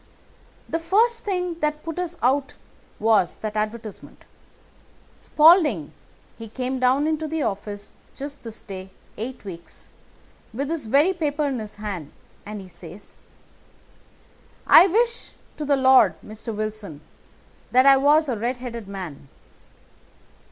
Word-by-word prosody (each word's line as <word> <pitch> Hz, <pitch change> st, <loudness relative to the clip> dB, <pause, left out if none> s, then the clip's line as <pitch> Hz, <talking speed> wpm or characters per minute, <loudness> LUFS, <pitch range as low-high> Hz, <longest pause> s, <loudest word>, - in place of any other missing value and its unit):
"The 330 Hz, -, -2 dB
first 445 Hz, +8 st, +2 dB
thing 360 Hz, -4 st, -2 dB
that 300 Hz, -1 st, -1 dB
put 330 Hz, +1 st, -5 dB
us 350 Hz, -1 st, -3 dB
out 270 Hz, +3 st, +1 dB, 0.4 s
was 215 Hz, -4 st, +2 dB
that 215 Hz, -1 st, -5 dB
advertisement. 215 Hz, 0 st, -5 dB, 0.9 s
Spaulding, 300 Hz, -, +4 dB, 0.5 s
he 225 Hz, -, -7 dB
came 255 Hz, +3 st, -3 dB
down 255 Hz, +3 st, +3 dB
into 315 Hz, 0 st, -1 dB
the 315 Hz, -1 st, -2 dB
office 205 Hz, +1 st, -5 dB, 0.2 s
just 285 Hz, +1 st, -7 dB
this 225 Hz, -2 st, -10 dB
day 190 Hz, -1 st, -8 dB, 0.3 s
eight 245 Hz, +1 st, -6 dB
weeks, 170 Hz, -3 st, -10 dB, 0.7 s
with 275 Hz, +3 st, -2 dB
this 320 Hz, -6 st, -3 dB
very 285 Hz, +11 st, +3 dB
paper 300 Hz, -4 st, -1 dB
in 270 Hz, -4 st, -1 dB
his 215 Hz, -1 st, -8 dB
hand, 200 Hz, -8 st, -6 dB, 0.4 s
and 210 Hz, -1 st, -6 dB
he 190 Hz, -, -11 dB
says: 175 Hz, +2 st, -13 dB, 1.5 s
"'I 360 Hz, -, +8 dB
wish 465 Hz, +5 st, 0 dB, 0.2 s
to 300 Hz, -, -4 dB
the 285 Hz, -1 st, +2 dB
Lord, 260 Hz, -9 st, +5 dB
Mr. 215 Hz, +2 st, -7 dB
Wilson, 215 Hz, -7 st, -5 dB, 0.7 s
that 255 Hz, +1 st, +4 dB
I 275 Hz, -1 st, +8 dB
was 295 Hz, +3 st, +4 dB
a 255 Hz, -, -1 dB
red 240 Hz, +4 st, -2 dB
headed 235 Hz, -4 st, -7 dB
man. 180 Hz, -8 st, -8 dB
255 Hz, 135 wpm, -23 LUFS, 210-305 Hz, 1.5 s, I